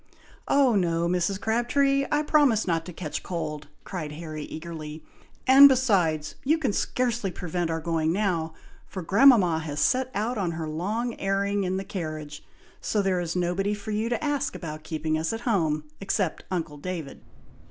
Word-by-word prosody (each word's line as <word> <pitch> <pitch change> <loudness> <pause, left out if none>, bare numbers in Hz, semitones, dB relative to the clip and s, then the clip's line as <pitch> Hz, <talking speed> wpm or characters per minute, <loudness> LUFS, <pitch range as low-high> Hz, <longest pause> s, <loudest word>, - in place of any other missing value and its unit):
"Oh 275 -4 +4
no, 170 -4 +1
Mrs. 180 +2 0
Crabtree! 275 +5 +1
I 295 0 +2
promise 290 -8 +3
not 165 -1 -1
to - - -6
catch 160 -3 -5
cold!" 155 -4 -5 0.2
cried 155 -6 -5
Harry, 155 -1 -6
eagerly; 155 -1 -7 0.4
"and, 275 +2 +9
besides, 180 - +2
you 305 +4 +3
can 270 -10 -1
scarcely 240 -4 0
prevent 175 -1 -3
our 165 0 -1
going 160 -1 0
now, 170 -5 -1 0.3
for 185 - -6
grandmama 195 -4 +5
has 150 -2 -5
set 255 - +2
out 220 +3 -1
on 175 -4 -1
her 160 -1 -4
long 210 +10 -2
airing 200 0 0
in 185 +1 -1
the 195 - -3
carriage, 155 -6 -6 0.4
so 210 -2 0
there 185 -2 +1
is 170 0 -3
nobody 180 +3 0
for 205 +1 -7
you 215 +2 -1
to 240 - -2
ask 285 -2 -1
about 155 -2 -6
keeping 155 0 -2
us 160 +6 -1
at 225 - -4
home, 160 -11 +1 0.2
except 195 -3 -1
uncle 165 -5 -3
David!" 165 -3 -6
185 Hz, 170 wpm, -26 LUFS, 160-225 Hz, 0.4 s, and